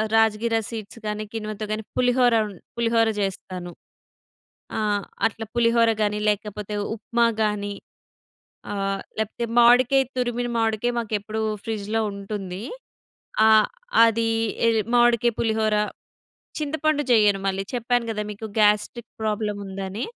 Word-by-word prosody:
Rajgira 225 Hz, +1 st, +3 dB
seeds 225 Hz, -1 st, -7 dB
గానీ 210 Hz, 0 st, -2 dB
కిన్వతో 215 Hz, -1 st, -4 dB
గానీ 215 Hz, +1 st, -2 dB
పులిహోర 245 Hz, -1 st, +3 dB
ఉం 205 Hz, -, -8 dB, 0.3 s
పులిహోర 230 Hz, -1 st, +3 dB
జేస్తాను. 185 Hz, -2 st, -4 dB, 1.1 s
ఆ! -, -, 0 dB, 0.5 s
అట్లా 225 Hz, 0 st, -7 dB
పులిహోర 230 Hz, -1 st, +4 dB
గాని, 210 Hz, 0 st, 0 dB
లేకపోతే 210 Hz, 0 st, -3 dB, 0.2 s
ఉప్మా 235 Hz, +2 st, +1 dB, 0.2 s
గాని 205 Hz, -1 st, -1 dB, 1.0 s
ఆహ్, 195 Hz, -1 st, -1 dB, 0.2 s
లేకపోతే 220 Hz, +2 st, -2 dB
మావిడికాయ 245 Hz, +3 st, +6 dB
తురిమిన 245 Hz, -1 st, -1 dB
మావిడికాయ 225 Hz, +1 st, +1 dB
మాకెప్పుడు 215 Hz, -1 st, -3 dB, 0.2 s
ఫ్రిడ్జ్‌లో 220 Hz, 0 st, -2 dB
ఉంటుంది. 200 Hz, -1 st, -6 dB, 0.8 s
ఆ! -, -, +7 dB, 0.6 s
అది 230 Hz, 0 st, +1 dB, 0.4 s
ఎ -, -, +5 dB, 0.3 s
మామిడికాయ, 240 Hz, 0 st, +4 dB
పులిహోర 220 Hz, -1 st, +1 dB, 0.8 s
చింతపండు 310 Hz, 0 st, 0 dB
చెయ్యను 210 Hz, -3 st, +5 dB
మళ్ళీ. 195 Hz, 0 st, 0 dB
చెప్పాను 245 Hz, 0 st, +1 dB
గదా! 210 Hz, -1 st, -2 dB
మీకు 220 Hz, +2 st, -7 dB
గాస్ట్రిక్ 210 Hz, +3 st, +2 dB
ప్రాబ్లం 210 Hz, -1 st, -1 dB
ఉందని. 195 Hz, +3 st, -4 dB
220 Hz, 115 wpm, -24 LUFS, 210-235 Hz, 1.1 s, ఆ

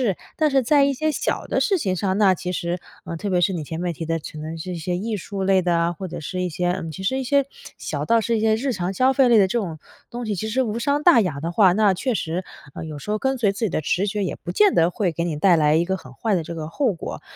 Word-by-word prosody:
智。 -, -, -38 dB, 0.3 s
但 -, -, -1 dB
是 270 Hz, -1 st, +4 dB
在 280 Hz, +3 st, +4 dB
一 280 Hz, -, +1 dB
些 310 Hz, +4 st, 0 dB
小 -, -, -2 dB
的 -, -, 0 dB
事 395 Hz, -, +2 dB
情 190 Hz, -9 st, -1 dB
上， 190 Hz, +1 st, 0 dB
那 195 Hz, -3 st, +5 dB
其 180 Hz, 0 st, -4 dB
实 175 Hz, 0 st, -2 dB, 0.2 s
呃， 170 Hz, -, -6 dB
特 205 Hz, -, -5 dB
别 180 Hz, -2 st, +2 dB
是 175 Hz, -, +3 dB
你 165 Hz, -4 st, -3 dB
前 160 Hz, +3 st, -5 dB
面 180 Hz, -1 st, -1 dB
提 165 Hz, +1 st, -6 dB
的， 165 Hz, 0 st, -1 dB
可 155 Hz, -, -9 dB
能 155 Hz, +2 st, -5 dB
是 175 Hz, +3 st, -6 dB
一 -, -, -4 dB
些 175 Hz, +2 st, -2 dB
艺 215 Hz, +4 st, -2 dB
术 195 Hz, +1 st, -5 dB
类 190 Hz, 0 st, +3 dB
的 175 Hz, -1 st, +2 dB
啊， 170 Hz, 0 st, +1 dB
或 190 Hz, +2 st, -6 dB
者 -, -, -6 dB
是 180 Hz, +4 st, -4 dB
一 -, -, 0 dB
些 175 Hz, +2 st, -1 dB
嗯， 165 Hz, -2 st, -4 dB
其 175 Hz, -, -8 dB
实 260 Hz, +7 st, 0 dB
一 -, -, -2 dB
些 280 Hz, +1 st, +2 dB, 0.3 s
小 145 Hz, -1 st, -4 dB
到 230 Hz, +6 st, +3 dB
是 230 Hz, +1 st, 0 dB
一 -, -, -1 dB
些 220 Hz, 0 st, +3 dB
日 260 Hz, +4 st, -1 dB
常 185 Hz, -4 st, -2 dB
消 255 Hz, +6 st, +3 dB
费 270 Hz, -1 st, +4 dB
类 235 Hz, -2 st, +5 dB
的 195 Hz, -, +5 dB
这 215 Hz, -, -1 dB
种 170 Hz, -7 st, -4 dB, 0.3 s
东 240 Hz, 0 st, -5 dB
西， 210 Hz, -, -1 dB
其 205 Hz, +4 st, -3 dB
实 240 Hz, +5 st, +1 dB
无 220 Hz, -2 st, -3 dB
伤 285 Hz, +4 st, +1 dB
大 345 Hz, -8 st, +7 dB
雅 155 Hz, -8 st, -2 dB
的 165 Hz, +2 st, -2 dB
话， 185 Hz, 0 st, +5 dB
那 205 Hz, 0 st, +3 dB
确 255 Hz, +7 st, -1 dB
实， 175 Hz, 0 st, -3 dB, 0.3 s
呃， -, -, -6 dB
有 155 Hz, -2 st, -7 dB
时 175 Hz, -, -9 dB
候 215 Hz, -, +1 dB
跟 265 Hz, +2 st, 0 dB
随 210 Hz, -4 st, +3 dB
自 200 Hz, -, -9 dB
己 -, -, 0 dB
的 155 Hz, -, -1 dB
直 180 Hz, +6 st, 0 dB
觉， 205 Hz, 0 st, -1 dB
也 -, -, -2 dB
不 -, -, -6 dB
见 420 Hz, -3 st, +4 dB
得 165 Hz, +1 st, +4 dB
会 185 Hz, -1 st, 0 dB
给 170 Hz, +1 st, -3 dB
你 165 Hz, -3 st, -2 dB
带 175 Hz, +3 st, +4 dB
来 150 Hz, -1 st, +3 dB
一 165 Hz, -, +3 dB
个 190 Hz, +2 st, -1 dB
很 130 Hz, -7 st, -13 dB
坏 220 Hz, -, -1 dB
的 170 Hz, -, -1 dB
这 170 Hz, -, -7 dB
个 155 Hz, -1 st, -5 dB
后 250 Hz, -, 0 dB
果。 170 Hz, -, -7 dB
190 Hz, 340 characters per minute, -22 LUFS, 170-230 Hz, 0.3 s, 大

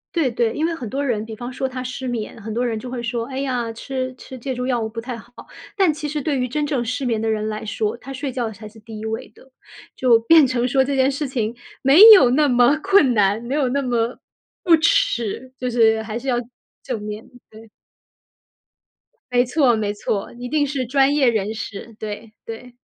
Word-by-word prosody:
对， 320 Hz, -6 st, +2 dB
对， 230 Hz, -1 st, 0 dB
因 310 Hz, -, 0 dB
为 335 Hz, -, -1 dB
很 255 Hz, -9 st, -6 dB
多 280 Hz, +4 st, -2 dB
人 225 Hz, -5 st, -1 dB
比 220 Hz, 0 st, -8 dB
方 245 Hz, +3 st, -7 dB
说 265 Hz, -, -2 dB
他 255 Hz, 0 st, -5 dB
失 255 Hz, +1 st, -5 dB
眠， 230 Hz, -2 st, -5 dB
很 220 Hz, +2 st, -6 dB
多 240 Hz, +3 st, -1 dB
人 225 Hz, -2 st, -2 dB
就 250 Hz, -, -8 dB
会 245 Hz, -1 st, -4 dB
说， 235 Hz, 0 st, -2 dB
哎 265 Hz, 0 st, -5 dB
呀， 250 Hz, -4 st, -2 dB
吃 255 Hz, +2 st, -4 dB
吃 260 Hz, 0 st, -10 dB
借 260 Hz, +2 st, -4 dB
助 250 Hz, 0 st, -3 dB
药 250 Hz, -2 st, 0 dB
物 220 Hz, -, -3 dB
不 230 Hz, +1 st, -6 dB
太 240 Hz, +2 st, -5 dB
好。 230 Hz, +1 st, -14 dB, 0.5 s
但 375 Hz, -6 st, +3 dB
其 300 Hz, 0 st, -5 dB
实 300 Hz, +1 st, -2 dB
对 285 Hz, -1 st, -1 dB
于 250 Hz, -, 0 dB
真 295 Hz, +4 st, -2 dB
正 280 Hz, -5 st, -1 dB
失 255 Hz, +3 st, -3 dB
眠 230 Hz, -3 st, 0 dB
的 225 Hz, -, -1 dB
人 215 Hz, -1 st, -1 dB
来 215 Hz, 0 st, -4 dB
说， 215 Hz, 0 st, -2 dB
他 265 Hz, +3 st, -10 dB
睡 270 Hz, +1 st, -4 dB
觉 240 Hz, -3 st, -3 dB
才 215 Hz, +1 st, -10 dB
是 220 Hz, +1 st, -15 dB
第 220 Hz, 0 st, -10 dB
1 220 Hz, -, -6 dB
位 220 Hz, 0 st, -4 dB
的。 265 Hz, -, -20 dB, 0.4 s
就 245 Hz, -3 st, +4 dB
变 305 Hz, +4 st, +6 dB
成 250 Hz, -1 st, 0 dB
说 265 Hz, +1 st, +3 dB
这 275 Hz, +1 st, -2 dB
件 265 Hz, +1 st, +3 dB
事 280 Hz, +1 st, -3 dB
情 235 Hz, -3 st, -2 dB, 0.3 s
没 275 Hz, +7 st, +6 dB
有 255 Hz, -10 st, +5 dB
那 295 Hz, +3 st, +3 dB
么 245 Hz, +2 st, +4 dB
困 305 Hz, -11 st, +4 dB
难， 205 Hz, -1 st, +2 dB
没 240 Hz, +3 st, -4 dB
有 285 Hz, -3 st, +1 dB
那 280 Hz, +2 st, -1 dB
么 240 Hz, -1 st, -1 dB, 0.4 s
不 340 Hz, -2 st, +6 dB
耻， 260 Hz, -, 0 dB
就 250 Hz, -, -2 dB
是 225 Hz, -2 st, +3 dB
还 220 Hz, 0 st, -5 dB
是 265 Hz, -, -8 dB
要 250 Hz, -2 st, +1 dB, 0.4 s
正 245 Hz, -4 st, -4 dB
面， 210 Hz, +1 st, -7 dB, 0.2 s
对。 220 Hz, +1 st, -14 dB, 1.6 s
没 245 Hz, 0 st, +3 dB
错， 250 Hz, -2 st, +3 dB
没 210 Hz, -2 st, -1 dB
错， 205 Hz, -1 st, -3 dB
一 245 Hz, 0 st, -6 dB
定 295 Hz, +1 st, +2 dB
是 270 Hz, -3 st, -3 dB
专 275 Hz, +2 st, +3 dB
业 280 Hz, -4 st, +4 dB
人 215 Hz, -2 st, -1 dB
士， 220 Hz, +1 st, -8 dB
对， 215 Hz, +1 st, -7 dB
对。 230 Hz, +2 st, -9 dB
245 Hz, 240 characters per minute, -21 LUFS, 225-270 Hz, 1.6 s, 变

